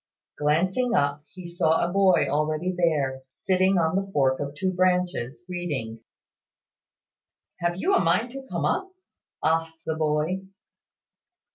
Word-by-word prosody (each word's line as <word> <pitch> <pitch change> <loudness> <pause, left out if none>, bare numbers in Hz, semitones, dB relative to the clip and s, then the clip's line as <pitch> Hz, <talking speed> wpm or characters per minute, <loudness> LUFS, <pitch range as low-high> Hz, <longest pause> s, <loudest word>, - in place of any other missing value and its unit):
Glancing 185 +12 +1
up, 145 +1 0
he 185 -1 -11
saw 170 -1 +1
a 175 - -5
boy 195 -5 +4
already 155 +5 0
there, 145 -7 0
sitting 185 +2 +2
on 165 0 +1
the 195 0 -2
fork 135 -5 +2
of 145 +1 -4
two 185 +5 -1
branches, 180 -6 0
reading. 145 -11 -4 1.6
"Have 175 0 0
you 370 - 0
a - - +5
mind 185 +9 +1
to 270 +1 -7
come - - -2
up?" 380 - 0 0.5
asked 165 0 0
the 160 - -1
boy. 155 +4 0
170 Hz, 135 wpm, -25 LUFS, 150-185 Hz, 1.6 s, a